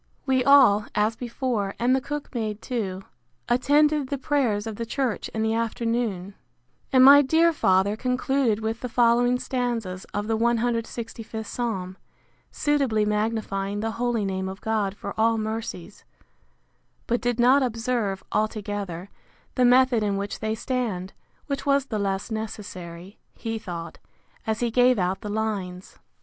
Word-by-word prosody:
We 260 -2 +2
all, 245 -7 +6
as 215 +2 +2
before, 235 -4 -2
and 250 +2 +3
the 265 - 0
cook 295 +2 -6
maid 215 -3 -3
too, 200 -6 -4 0.4
attended 290 +3 +3
the 280 - -2
prayers 255 -7 0
of 220 -2 -5
the 230 - -3
church 255 -3 -2
in 220 - -2
the 220 0 +1
afternoon; 230 -4 -2 0.6
and 260 -1 +7
my 285 +1 +10
dear 325 +4 +3
father 190 -6 +2
concluded 250 -1 0
with 220 +1 -2
the 250 - -5
following 240 +1 +3
stanzas 235 -8 -3
of 205 0 -4
the 225 +1 0
cxlvth 230 -1 -2
psalm; 195 -6 -3 0.5
suitably 275 -8 +1
magnifying 210 -2 -1
the 225 0 -1
holy 240 -4 0
name 190 -1 -2
of 190 +1 -8
God 210 -3 -1
for 200 - -6
all 225 +1 +3
mercies; 215 -4 -5 1.0
but 240 +1 0
did 245 -1 -1
not 255 +4 +5
observe, 230 -5 -1
altogether, 205 -4 -2 0.5
the 250 - +3
method 250 -1 +5
in 200 -2 0
which 200 +1 -4
they 220 0 -1
stand; 225 -6 -3 0.3
which 280 -2 -3
was 275 -1 +3
the 220 -6 -3
less 195 +2 -2
necessary, 195 -4 -7 0.2
he 225 -1 -4
thought, 170 -5 -7 0.5
as 220 +1 -1
he 240 -1 0
gave 250 +1 +4
out 185 0 -1
the 210 - -5
lines. 200 -4 -4
225 Hz, 150 wpm, -25 LUFS, 205-250 Hz, 1.0 s, my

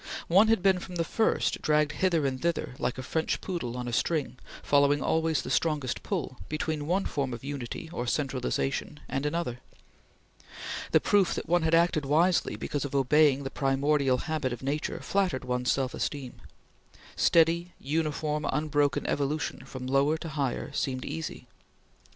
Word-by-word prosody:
One 195 +6 +6
had 225 -5 +2
been, 190 -2 +4
from 180 0 -8
the 170 - +1
first, 220 +6 +1
dragged 150 -1 +2
hither 170 -6 +1
and 130 -1 -2
thither 170 -6 -1
like 125 +1 -1
a 130 - -5
French 160 +5 -1
poodle 125 -10 -4
on 125 0 -4
a 120 - -4
string, 130 -2 0 0.2
following 145 0 +4
always 160 +2 +1
the - - -5
strongest 150 -6 0
pull, 160 -10 -3
between 155 -1 -2
one 190 +4 +1
form 135 -4 -2
of 120 - -11
unity 140 +1 -5
or 120 - -3
centralization 135 +2 -1
and 135 +2 -1
another. 145 -6 -2 1.3
The - - +5
proof 200 -3 +3
that - - -5
one 175 +1 +3
had 160 +1 +3
acted 165 -2 +3
wisely 165 +5 +3
because 145 - -3
of 140 -1 -4
obeying 140 +1 +4
the 135 - -5
primordial 135 -1 +2
habit 155 -3 -2
of 120 - -6
nature 145 +3 -2
flattered 185 -10 0
one's 125 0 0
self 135 -1 0
esteem. 135 -4 -4 0.7
Steady, 170 +1 +3
uniform, 150 0 -1
unbroken 145 -2 +1
evolution 145 +2 -2
from 130 -1 -7
lower 140 +4 +2
to 165 - -6
higher 145 -3 -2
seemed 130 -2 -2
easy. 80 0 -5
145 Hz, 165 wpm, -28 LUFS, 135-165 Hz, 1.3 s, One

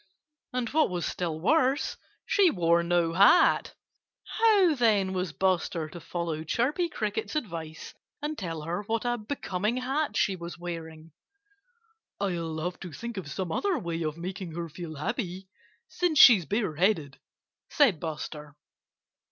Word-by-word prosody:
And 250 -2 -2
what 315 +1 +2
was 175 -2 -2
still 165 -3 -3
worse, 275 - +2 0.3
she 390 -3 +4
wore 170 - +2
no 170 -1 +1
hat. 200 - +5 0.6
How, 415 -7 +5
then, 210 -7 +2
was 180 -2 -2
Buster 175 -2 0
to 175 - -9
follow 165 -1 -4
Chirpy 280 - 0
Cricket's 215 +1 -3
advice 165 - -5 0.3
and 300 +1 -3
tell 165 - -5
her 170 +5 -3
what 230 +1 -1
a 240 0 0
becoming 210 -2 -2
hat 270 +4 -1
she 195 - +2
was 170 -1 -8
wearing? 165 -2 -7 1.1
"I'll 170 -5 -2
have 180 +2 -4
to 180 - -8
think 235 +8 -7
of 180 -6 -5
some 175 +4 -4
other 390 - 0
way 170 - -4
of 155 -1 -2
making 180 0 -6
her 170 -1 -4
feel 160 0 -8
happy 190 - -4 0.4
since 350 -4 0
she's 210 - +8
bareheaded," 175 - 0 0.5
said 245 - +3
Buster. 150 -2 -6
180 Hz, 145 wpm, -28 LUFS, 165-240 Hz, 1.1 s, she's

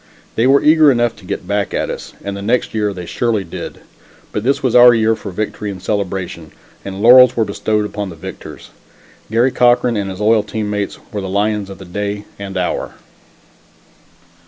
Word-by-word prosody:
They 115 +3 +2
were 140 +1 +4
eager 155 -1 +6
enough 120 -2 +1
to 95 - -15
get 95 -1 -5
back 100 -1 -1
at - - -1
us - - -8
and 100 0 -4
the 100 - -6
next 120 +5 0
year 105 -2 0
they 90 -3 -7
surely 110 +4 -1
did. 85 - -8 0.5
But 105 - -2
this 135 +3 0
was 130 -3 +1
our 120 -1 +8
year 110 0 +2
for - - -8
victory 105 +2 -4
and 95 -2 -6
celebration, 95 -5 -4 0.3
and 100 +1 -6
laurels 125 +1 +8
were 115 - +2
bestowed 105 +1 -1
upon 105 -1 -4
the 85 - -9
victors. 80 - -10 0.6
Garry 120 +4 +2
Cochran 120 -1 +3
and 100 -1 -2
his 95 0 -7
loyal 110 +1 +3
team 105 0 -4
mates 105 -1 -3
were 105 - -3
the 95 - -5
lions 105 0 -1
of 95 - -9
the 95 - -11
day 100 +3 -4
and 100 -1 -6
hour. 90 - -2
105 Hz, 195 wpm, -17 LUFS, 100-115 Hz, 0.6 s, our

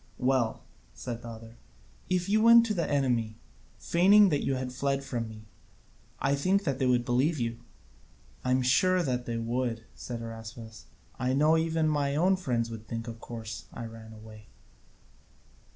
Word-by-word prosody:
"Well," 125 -3 0 0.3
said 120 -2 -6
the 120 - -9
other, 115 0 -10 0.5
"if 180 -1 0
you 215 +2 +3
went 230 +1 +8
to 220 - -1
the 170 -5 -1
enemy, 120 -6 0 0.4
feigning 195 +4 +5
that 145 -4 0
you 135 - 0
had 130 -1 -4
fled 140 +1 -1
from 120 -4 -4
me, 110 0 -11 0.7
I 140 - +1
think 185 +8 +1
they 135 -5 0
would 125 -1 +2
believe 130 +6 +1
you." 115 -1 -2 0.8
"I - - -2
am 130 0 +2
sure 185 +8 +3
they 125 -4 -2
would," 115 0 -2
said 120 -2 -6
Araspas, 115 0 -9 0.3
"I 130 0 0
know 150 +4 +4
even 160 -1 +1
my 145 -2 0
own 185 +5 +3
friends 120 -10 -2
would 110 -1 -8
think 115 0 -4
that 115 - -5
of 115 - -12
course 115 -2 -7
I 115 - -7
ran 115 -1 -10
away." 110 -1 -13
125 Hz, 170 wpm, -29 LUFS, 115-155 Hz, 0.8 s, went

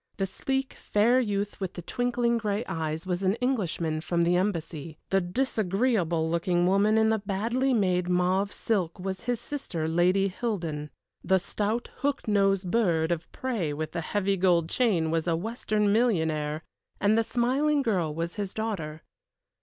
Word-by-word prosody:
The 195 - 0
sleek, 265 +7 -2
fair 230 +5 +2
youth 205 -4 -2
with 190 -2 -3
the 175 - -6
twinkling 240 +2 0
gray 210 +1 -1
eyes 160 +1 -3
was 180 0 -2
an 190 +1 +2
Englishman 185 -11 -1
from 170 +1 0
the 175 +1 +3
Embassy. 165 -5 -2
The 195 0 +4
disagreeable 195 -4 0
looking 175 +1 +1
woman 200 +4 +3
in 220 0 +4
the 220 0 +2
badly 225 +7 0
made 180 -6 +1
mauve 185 +3 +2
silk 185 -6 -1
was 190 +2 -4
his 245 -2 0
sister, 195 - -4
Lady 180 +4 +3
Hildon. 175 -8 -3 0.3
The 190 - +3
stout, 215 +5 -2
hook 280 -2 -1
nosed 195 -3 +2
bird 170 -8 +2
of 170 -1 -3
prey 220 - -2
with 155 +1 -4
the 170 - -3
heavy 200 +3 0
gold 175 -3 +3
chain 185 -11 +1
was 165 +1 0
a 165 - +2
Western 210 +1 0
millionaire, 160 -9 +1 0.4
and 205 +1 +3
the 225 - +3
smiling 275 +6 +1
girl 185 -10 0
was 165 +2 -4
his 200 -2 -4
daughter. 175 -9 -3
195 Hz, 160 wpm, -27 LUFS, 170-225 Hz, 0.4 s, The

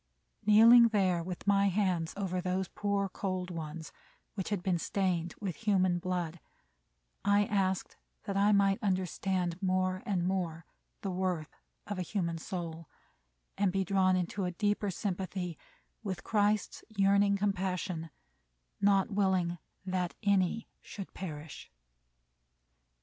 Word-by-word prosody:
Kneeling 230 +3 +9
there 190 -6 +2
with 180 +1 -6
my 200 0 +4
hands 180 -4 0
over 185 -2 -1
those 185 +1 -1
poor, 200 0 -1
cold 185 -1 -3
ones, 160 -1 -6 0.4
which 190 -3 -4
had 200 -4 -2
been 185 -3 +1
stained 175 -2 -1
with 195 -5 -4
human 185 -5 +2
blood, 175 -2 -2 0.8
I 205 +1 +4
asked 190 -2 -1 0.3
that 200 - -4
I 200 +1 +4
might 200 -1 +3
understand 185 -2 -1
more 185 0 +1
and 185 -4 0
more 175 -3 -2 0.4
the 195 - -2
worth 180 -4 -2 0.3
of 205 -2 -4
a - - 0
human 170 -2 -2
soul, 165 -2 -6 0.7
and 200 -2 +3
be 195 +1 +1
drawn 185 0 +3
into 185 +2 -1
a 180 - -1
deeper 205 +2 0
sympathy 185 -2 -3 0.5
with 185 -5 -4
Christ's 210 -1 +1
yearning 200 -1 +3
compassion, 185 -4 -1 0.7
"not 200 0 +3
willing 185 -4 +1 0.3
that 185 -2 -1
any 200 +1 +2
should 195 -2 -8
perish." 155 -4 -7
185 Hz, 130 wpm, -31 LUFS, 175-200 Hz, 0.8 s, Kneeling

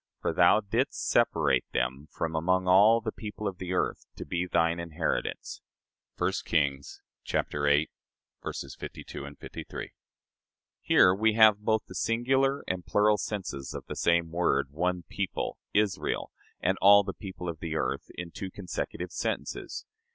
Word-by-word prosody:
For - - -1
thou 110 - +5
didst 100 - -1
separate - - +3
them 65 +4 -1
from 80 +2 -3
among 90 +3 +1
all 105 +5 +6
the 110 -1 -3
people 105 -1 -6
of 95 -2 -5
the 90 0 -3
earth, - - -1
to - - -7
be 85 +4 -2
thine 85 -1 +2
inheritance." 85 -1 -3 0.6
(1 90 +1 +1
Kings 70 -4 -1 0.3
viii, 75 +1 +2 0.6
52, 70 +1 -7
53.) - - -7 0.9
Here 90 - +5
we 110 +3 +2
have 110 -2 +6
both 110 +1 0
the - - -11
singular 130 +7 +1
and 90 -1 -2
plural 105 +2 +3
senses 90 -10 -4
of - - -6
the - - -6
same 85 -1 +2
word 85 -5 +1
one 90 +3 -1
people, 100 -3 -3
Israel, 105 -2 0 0.3
and - - 0
all 100 +1 +8
the - - -4
people 95 -3 -8
of 85 -2 -4
the 80 -1 -4
earth - - -2
in 85 -1 -6
two 95 - -6
consecutive 90 -1 -5
sentences. - - -4
90 Hz, 145 wpm, -29 LUFS, 80-105 Hz, 0.9 s, all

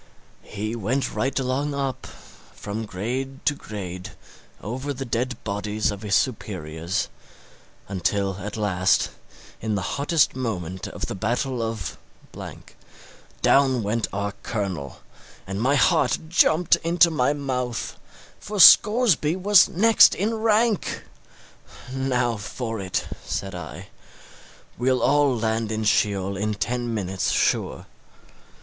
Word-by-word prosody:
He 110 +3 -5
went 120 +5 -1
right 135 +1 -1
along 135 +2 -1
up, 135 -2 -3
from 110 +2 -9
grade 130 +8 -4
to 150 - +3
grade, 95 -8 -7 0.5
over 130 +7 -4
the 135 +2 -5
dead 125 +2 -2
bodies 105 +1 -1
of 100 -1 -7
his 105 -2 0
superiors, 90 - -2 0.8
until 95 0 -1
at 105 +3 -6
last, 95 -3 +1 0.5
in 110 -1 -1
the 100 - -2 0.2
hottest 150 -1 +2
moment 95 -8 -4
of - - -5
the - - -5
battle 120 +5 -1
of... 115 -5 -4 1.4
down 130 -4 +4
went 110 +3 -1
our 100 +1 -2
colonel, 95 - -4 0.4
and 95 +2 -4
my 135 +4 +3
heart 160 +4 +3
jumped 165 0 +4
into 170 +1 +3
my 140 -3 +2
mouth, 125 -4 -3 0.4
for 210 0 -5
Scoresby 210 -6 +7
was 195 0 +5
next 225 +5 +6
in 210 +5 -1
rank! 220 -1 +1 0.9
Now 125 -3 0
for 115 +2 -5
it, 95 -2 -2 0.2
said 95 -1 -4
I; 90 -3 -8 0.9
we'll 130 +1 +1
all 145 -3 +3
land 110 0 -1
in 110 0 -2
Sheol 100 -2 +1
in 105 +2 -1
ten 120 +4 -2
minutes, 95 -4 -2
sure. - - 0
115 Hz, 120 wpm, -24 LUFS, 100-140 Hz, 1.4 s, Scoresby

